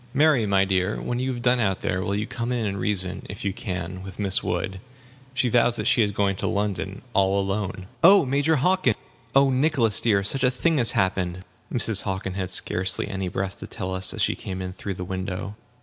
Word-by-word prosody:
"Mary, 145 -7 +4
my 100 -1 +3
dear, 95 +1 0
when 120 0 -3
you 130 +1 -1
have 120 -2 -5
done 125 0 +3
out 95 -4 0
there, 90 - -1
will 100 +2 -1
you 105 +1 -1
come 120 +1 -4
in 120 -3 -1
and 100 -1 -2
reason 95 -2 -1
if 100 0 -7
you 100 - 0
can 95 -4 -5
with 95 -1 -9
Miss 100 -2 +1
Wood. 95 0 -2 0.6
She 130 - +2
vows 120 0 +3
that - - -2
she 120 - +4
is 105 - +3
going 100 -1 0
to - - -2
London, 100 -1 -2
all 100 0 +3
alone." 95 -1 -2 0.2
"Oh, 190 0 +8
Major 140 +4 +2
Hockin 150 - +2 0.4
oh, 135 0 +5
Nicholas 130 -5 +3
dear, 100 -4 +2
such 130 +7 +2
a 125 - +5
thing 150 +5 +1
has 115 - +2
happened!" 90 -1 0 0.3
Mrs. 110 -4 +2
Hockin 95 -1 -3
had 95 -1 -3
scarcely 90 -1 0
any 95 -2 -3
breath 95 +2 -3
to - - -8
tell 95 -4 -5
us, 95 0 -1
as - - -2
she - - +2
came 95 -1 -6
in 90 0 -5
through 95 0 -5
the 90 0 -5
window. 95 +2 -4
100 Hz, 220 wpm, -24 LUFS, 95-120 Hz, 0.6 s, Oh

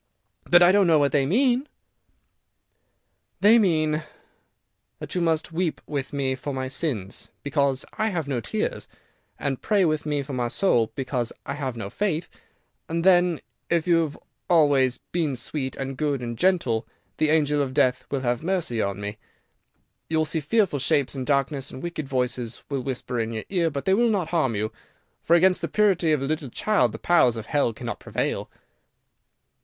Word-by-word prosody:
"But 175 0 +6
I 175 - +7
don't 200 -1 +4
know 160 -2 +5
what 145 -1 +2
they 135 -2 +2
mean." 250 - +2 1.7
"They 220 +4 +6
mean," 160 -7 +2
he 150 - 0
said, - - -9
sadly, 155 - -27
"that - - -7
you 180 - 0
must 165 0 0
weep 165 0 -1
with 140 -3 -4
me 135 -2 -1
for 130 +2 -5
my 130 0 -2
sins, 125 - -3
because 140 -2 0
I 220 - +2
have 170 -8 -2
no 130 -4 -1
tears, - - -3 0.5
and 135 -2 -3
pray 205 -3 +2
with 155 -1 0
me 145 -2 0
for 140 0 -7
my 125 -2 -1
soul, 120 - +2
because 125 -3 -2
I 140 - -3
have 135 -4 -4
no 100 -3 -5
faith, 180 -5 -1 0.6
and 165 +1 -1
then, 175 -3 +4 0.3
if 170 -2 +1
you 175 -2 +4
have 155 -3 -3 0.3
always 140 -7 +4
been 160 -6 0
sweet, 130 +2 -4
and 135 0 -4
good, 145 -4 -1
and 120 -1 -4
gentle, 125 -7 +1 0.3
the 155 - +2
angel 150 -2 +2
of 135 -2 -3
death 130 -3 +2
will 140 -2 -2
have 120 -1 0
mercy 165 - -1
on 100 0 -2
me. 105 +1 -5 0.9
You 160 - +1
will 155 - +2
see 160 +1 -1
fearful 170 -1 +1
shapes 140 0 +1
in 130 -2 -4
darkness, 140 -1 0
and 130 - -9
wicked 160 -5 -5
voices 125 -3 -2
will 140 -2 -2
whisper 125 -2 -3
in 115 0 -2
your 110 - -4
ear, 175 -4 +1
but 140 -2 -5
they 190 - +3
will 235 +4 +3
not 190 -7 0
harm 155 -9 +1
you, 110 +1 -2 0.5
for 170 - +3
against 185 +2 +4
the - - -1
purity 190 -6 +2
of 150 -3 +1
a - - 0
little 150 -2 -2
child 125 - +1
the 110 - -7
powers 125 -6 +3
of 110 - -6
Hell 145 -5 +1
cannot 110 - -6
prevail." - - -2
145 Hz, 190 wpm, -25 LUFS, 130-170 Hz, 1.7 s, I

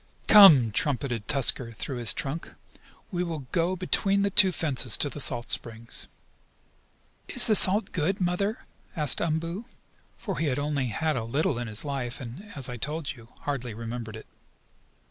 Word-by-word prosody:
"Come!" 160 - +8
trumpeted 125 -3 -2
Tusker 130 -4 0
through 125 +5 -5
his 115 -4 +3
trunk, 145 +10 -6 0.6
"we 180 -1 -2
will 160 -6 -6
go 175 +1 0
between 195 +2 0
the 200 - -1
two 195 -1 +7
fences 135 -9 +1
to 145 - +1
the - - -8
salt 120 -3 -1
springs." 115 0 0 1.2
"Is - - +6
the 220 - +4
salt 205 +1 +5
good, 180 +4 -2
Mother?" 195 +5 -2 0.3
asked 150 -5 +2
Umboo, 165 +6 -3 0.5
for 195 -6 -6
he 160 - -1
had 130 - -1
only 145 -2 -2
had 155 +6 -2
a 115 - -3
little 125 +2 -2
in 120 - -5
his 110 +5 -4
life, 135 -4 -5
and 135 - -10
as 135 -3 -3
I 125 -1 -7
told 150 +4 -4
you, 120 -4 -15
hardly 125 -6 -5
remembered 115 0 -7
it. 110 - -11
145 Hz, 165 wpm, -26 LUFS, 120-175 Hz, 1.2 s, Come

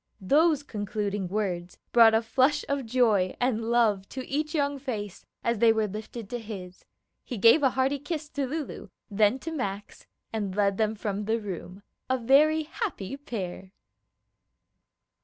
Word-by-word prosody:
Those 295 - +3
concluding 205 -4 -3
words 180 -3 -3
brought 230 -2 +7
a 225 - +2
flush 260 +5 +2
of 280 -4 -2
joy 220 -6 +2
and 240 -3 0
love 215 -5 +2
to 260 -1 -6
each 300 +3 -2
young 285 -2 0
face 215 -8 -5 0.2
as 235 -2 0
they 230 0 +6
were 220 -1 +1
lifted 215 +2 -7
to 245 - -2
his. 190 -5 -9 0.4
He 245 - -6
gave 230 +9 +6
a 270 - +5
hearty 265 +3 0
kiss 300 +1 -4
to 280 -2 -2
Lulu, 305 +2 -5 0.2
then 210 +4 +3
to 325 +5 -6
Max, 205 -9 -5 0.3
and 205 -4 -2
led 200 -1 +1
them 220 0 +1
from 205 -1 -3
the 225 +2 +1
room, 190 -1 -7 0.3
a 260 - +2
very 295 +6 +4
happy 300 - -4
pair. 190 -8 -6
225 Hz, 155 wpm, -27 LUFS, 205-275 Hz, 0.4 s, brought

